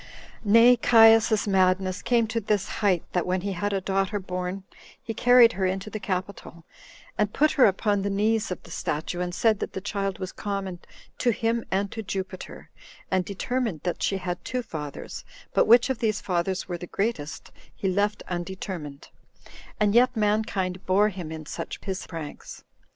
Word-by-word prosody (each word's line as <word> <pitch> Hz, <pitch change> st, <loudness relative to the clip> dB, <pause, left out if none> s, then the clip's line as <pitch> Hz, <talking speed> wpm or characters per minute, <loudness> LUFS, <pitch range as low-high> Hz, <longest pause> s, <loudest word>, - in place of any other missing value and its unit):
2. 210 Hz, -, -5 dB
Nay, 230 Hz, +3 st, +7 dB
Caius's 225 Hz, -2 st, +5 dB
madness 185 Hz, 0 st, +2 dB
came 235 Hz, -1 st, +2 dB
to 225 Hz, +1 st, -2 dB
this 210 Hz, -1 st, 0 dB
height, 190 Hz, -5 st, +2 dB
that 180 Hz, -, +1 dB
when 185 Hz, 0 st, 0 dB
he 200 Hz, +1 st, -3 dB
had 205 Hz, +3 st, -2 dB
a 195 Hz, -, 0 dB
daughter 195 Hz, +2 st, -1 dB
born, 185 Hz, 0 st, -4 dB, 0.4 s
he 225 Hz, -, -6 dB
carried 245 Hz, 0 st, +6 dB
her 190 Hz, 0 st, -1 dB
into 190 Hz, +3 st, -3 dB
the 215 Hz, -, -4 dB
capitol, 185 Hz, -3 st, -5 dB, 0.5 s
and 210 Hz, -1 st, +1 dB
put 305 Hz, +1 st, +3 dB
her 265 Hz, -, +5 dB
upon 205 Hz, +1 st, +1 dB
the 200 Hz, -, -1 dB
knees 210 Hz, +2 st, +1 dB
of 180 Hz, -, -5 dB
the 170 Hz, -, -14 dB
statue, 160 Hz, +3 st, -3 dB
and 175 Hz, 0 st, -3 dB
said 220 Hz, -3 st, +2 dB
that -, -, -4 dB
the -, -, -3 dB
child 195 Hz, -1 st, -3 dB
was 185 Hz, -1 st, -5 dB
common 195 Hz, -3 st, -4 dB, 0.4 s
to 245 Hz, -, +2 dB
him 230 Hz, 0 st, 0 dB
and 195 Hz, +1 st, -1 dB
to 225 Hz, -, -5 dB
Jupiter, 190 Hz, -2 st, -6 dB, 0.4 s
and 185 Hz, -1 st, +2 dB
determined 205 Hz, -, -2 dB
that 175 Hz, -, -2 dB
she 195 Hz, -, +1 dB
had 180 Hz, -2 st, -4 dB
two 250 Hz, -1 st, -3 dB
fathers, 150 Hz, -9 st, -7 dB, 0.3 s
but -, -, +3 dB
which 235 Hz, +2 st, +7 dB
of 260 Hz, -, -3 dB
these 215 Hz, -3 st, 0 dB
fathers 180 Hz, 0 st, -2 dB
were 175 Hz, -2 st, -4 dB
the 175 Hz, -, -7 dB
greatest 170 Hz, -9 st, -3 dB, 0.2 s
he 195 Hz, -, -2 dB
left 205 Hz, +3 st, 0 dB
undetermined; 175 Hz, -5 st, -6 dB, 0.7 s
and 210 Hz, -1 st, +3 dB
yet 250 Hz, +1 st, +4 dB
mankind 205 Hz, -3 st, 0 dB
bore 200 Hz, +3 st, +4 dB
him 180 Hz, -5 st, -7 dB
in 160 Hz, -1 st, -7 dB
such -, -, -6 dB
his 190 Hz, -2 st, -4 dB
pranks. 160 Hz, -3 st, -8 dB
195 Hz, 180 wpm, -26 LUFS, 185-220 Hz, 0.7 s, Nay